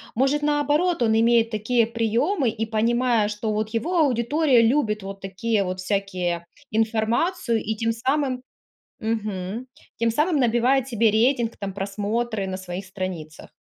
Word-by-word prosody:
Может, 270 +5 +2
наоборот, 295 +3 +1
он 220 -2 +3
имеет 230 0 +4
такие 225 +1 +1
приемы 235 - +1
и, 225 0 -3
понимая, 230 0 +1
что 215 +1 -2
вот 215 0 -1
его 315 +11 -1
аудитория 270 0 +3
любит 225 -3 +2
вот 195 0 -7
такие 200 +3 -1
вот 185 0 -4
всякие 185 -3 -2 0.3
информацию 225 - 0
и 220 +1 -2
тем 230 +1 0
самым 260 +2 -1 0.6
мгм, 215 0 -3 0.3
тем 230 0 +1
самым 300 +8 +1
набивает 245 +2 +2
себе 230 -3 +2
рейтинг, 235 +1 +2
там, 200 -2 -4
просмотры 205 +2 -2
на 190 - -3
своих 185 +1 -6
страницах? 185 -5 -6
225 Hz, 140 wpm, -24 LUFS, 205-250 Hz, 0.6 s, имеет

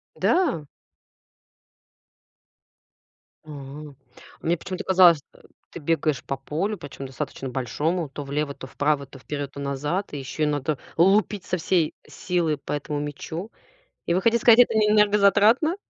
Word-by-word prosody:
Да? 275 - +1 2.8
А. 155 - -13 0.9
Мне 170 +2 +1
почему-то 185 +3 -6
казалось, 180 -5 +6
э, - - -20 0.3
ты - - -8
бегаешь 155 -2 0
по 135 - -3
полю, 170 +10 -3
причём 135 0 -8
достаточно 130 +1 -6
большому, 150 +7 -2
то 145 +1 -7
влево, 140 +1 -2
то 130 - -9
вправо, 145 +1 0
то 135 0 -14
вперёд, 145 +1 -5
то 140 - -8
назад. 145 +8 -2
И 145 - -4
ещё 135 +3 -5
и - - +2
надо 145 0 -1 0.2
лупить 195 +3 +3
со 185 - -1
всей 170 -1 +1
силы 170 -4 -1
по 140 - -7
этому 145 0 -3
мячу. 160 +7 -6 0.6
И 170 - +1
вы 185 - +1
хотите 230 +1 +2
сказать, 235 0 +7
это 245 - +6
не 215 -1 +3
энергозатратно? 210 - +4
160 Hz, 145 wpm, -24 LUFS, 145-195 Hz, 2.8 s, сказать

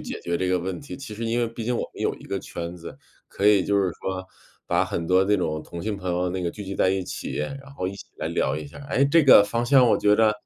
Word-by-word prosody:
解 - - -6
决 85 0 -1
这 95 - 0
个 90 0 +2
问 90 +1 -4
题， 140 - -8
其 135 -6 -8
实 115 +2 -5
因 115 +1 0
为 120 - +1
毕 115 0 -7
竟 125 +2 0
我 - - -1
们 - - -10
有 - - +1
一 - - -14
个 100 - -3
圈 85 -1 -6
子， 85 - -10 0.3
可 100 - -5
以 100 -3 +5
就 100 - +1
是 95 - +1
说， 95 -1 -3 0.4
把 - - +2
很 85 - -3
多 95 +3 +3
那 105 +1 +3
种 80 -4 -2
同 85 - -7
性 105 -2 -2
朋 95 -1 -6
友 90 +1 0
那 95 - -3
个 85 -1 -1
聚 105 - -8
集 95 0 -5
在 - - +3
一 95 0 0
起， - - -6
然 140 - -5
后 90 - -2
一 100 - -6
起 - - -11
来 - - -2
聊 - - 0
一 75 - -5
下 70 - -12
儿。 140 - -10
哎， 140 - +2
这 150 +2 +4
个 130 - +9
方 115 +4 -1
向 130 -1 +6
我 - - +3
觉 105 0 +4
着 110 0 +4
100 Hz, 325 characters per minute, -24 LUFS, 90-115 Hz, 0.4 s, 个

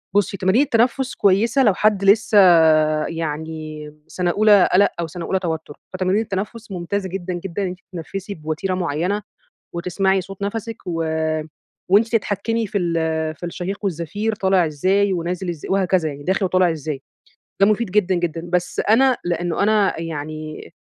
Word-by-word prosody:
بُصّي، 200 -1 +1
تمارين 190 +7 +3
التنفس 255 0 +1
كويسة 225 +7 +3
لو 210 -5 +4
حد 205 0 +2
لسه 210 +2 +4 0.7
يعني 155 -1 -5 0.2
سنة 175 +1 -1
أولى 205 -1 +5
قلق 200 +2 +5
أو 170 - -1
سنة 170 +1 -7
أولى 190 - 0
توتر، 160 -4 -5
فتمارين 185 +3 +1
التنفس 215 +2 -5
ممتازة 190 +2 -3
جدًا، 185 0 -4
جدًا 180 +2 -4
إن - - 0
أنتِ 180 0 -7
تتنفسي 195 +3 -6
بوتيرة 155 +4 -3
معينة 180 +3 -1 0.5
وتسمعي 190 +2 +1
صوت 195 +2 -11
نفَسِك 225 +3 -4
و 165 -2 -2 0.9
وأنتِ 210 +4 +5
تتحكمي 225 0 0
في 205 +1 -2
ال 175 -3 -1 0.4
في 175 - -8
الشهيق 180 +3 -4
والزفير، 195 +5 -2
طالع 190 -3 +2
إزاي 190 +6 +1
ونازل 175 +1 -3
إزاي 165 -4 -6
وهكذا، 185 -4 +2
يعني 145 0 -8
داخل 190 +4 +1
وطالع 185 -1 +3
إزاي. 155 -3 -5 0.6
ده 195 - +6
مفيد 215 0 +1
جدًا، 190 -2 +2
جدًا. 170 -1 -3
بس 180 0 0
أنا 255 +4 +5
لأنه 175 +1 -1
أنا 210 -4 +2
يعني 155 -1 -6
185 Hz, 155 wpm, -21 LUFS, 170-205 Hz, 0.9 s, ده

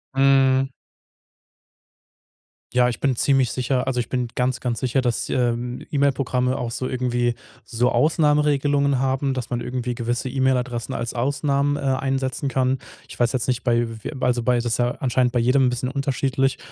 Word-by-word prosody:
Mhm. 135 -1 +4 2.0
Ja, 125 0 +4
ich 120 - -5
bin 135 -2 +1
ziemlich 135 -1 +2
sicher 125 0 -1
also 130 -2 -1
ich 120 - -3
bin 125 -2 -1
ganz 125 0 0
ganz 120 -3 -2
sicher, 130 +1 0
dass, 120 -2 -1
ähm, 120 -1 -1
E-Mail-Programme 135 -3 +1
auch 120 -1 -3
so 130 +2 -3
irgendwie 120 -1 0 0.3
so 120 +1 0
Ausnahmeregelungen 145 -2 +2
haben, 135 +1 0
dass 125 -2 -5
man 120 -1 -1
irgendwie 125 0 -3
gewisse 120 +2 -2
E-Mail-Adressen 130 -2 0
als 115 0 -3
Ausnahmen, 140 +3 0
äh, - - -6
einsetzen 135 0 -1
kann. 130 0 +1 0.3
Ich - - -12
weiß 120 -1 +3
jetzt 130 -2 -1
nicht 125 -1 -1
bei 120 -1 +2 0.2
w - - -4
also, 125 -1 +1
bei 125 +1 +2
das 120 0 -1
ist 120 0 0
ja 120 0 +1
anscheinend 125 -1 +1
bei 120 - +2
jedem 130 +3 +3
'n - - +3
bisschen 125 +1 -2
unterschiedlich, 135 -1 0
130 Hz, 170 wpm, -22 LUFS, 120-135 Hz, 2.0 s, Mhm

